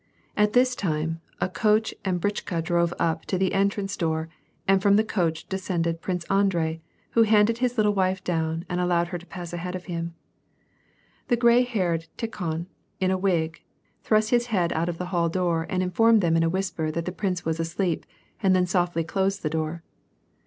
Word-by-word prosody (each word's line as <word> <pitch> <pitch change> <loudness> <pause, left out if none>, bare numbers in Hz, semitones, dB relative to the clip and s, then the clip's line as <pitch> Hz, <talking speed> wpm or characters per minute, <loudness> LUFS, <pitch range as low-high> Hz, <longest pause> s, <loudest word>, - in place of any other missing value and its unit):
At 210 0 +2
this 250 +1 +4
time, 165 -3 -2 0.2
a - - +1
coach 215 +5 +1
and 185 -2 0
a - - -5
britchka 185 -3 -2
drove 170 0 +1
up 160 -1 0
to 185 - -1
the 190 0 +1
entrance 200 0 0
door 160 -1 -1 0.4
and 195 0 +4
from 200 +1 +5
the 215 - +4
coach 170 -7 -1
descended 170 -3 -2
Prince 180 -2 -2
Andrei, 170 -5 +1 0.3
who 230 - +4
handed 220 +1 +4
his 250 -1 0
little 210 -1 +3
wife 190 -1 0
down 165 -1 -1
and 180 0 -1
allowed 175 -1 +1
her 175 -1 -4
to 175 - -15
pass 175 -2 -7
aliead 180 +1 -4
of 185 - -7
him. 170 -1 -4 1.1
The 240 - +2
gray 235 +1 +5
haired 180 -9 -1
Tikhon, 170 -7 -3 0.3
in 185 0 +2
a - - +2
wig, 170 -4 0 0.4
thrust 215 0 +2
his 240 0 +3
head 180 -7 +1
out 165 +2 0
of 170 - -4
the 180 - -3
hall 170 -1 +2
door 170 -2 0
and 185 0 0
infonned 225 +5 +4
them 165 -2 +2
in 165 - +3
a 165 - +2
whisper 180 -3 -2
that 165 +2 -3
the 180 - -2
prince 180 -1 -2
was 160 0 -1
asleep 165 +1 -1 0.3
and 190 -3 +4
tlien 180 -1 +2
softly 175 -2 +1
closed 195 +4 -1
the 155 - -1
door. 160 +1 -2
180 Hz, 195 wpm, -25 LUFS, 165-200 Hz, 1.1 s, from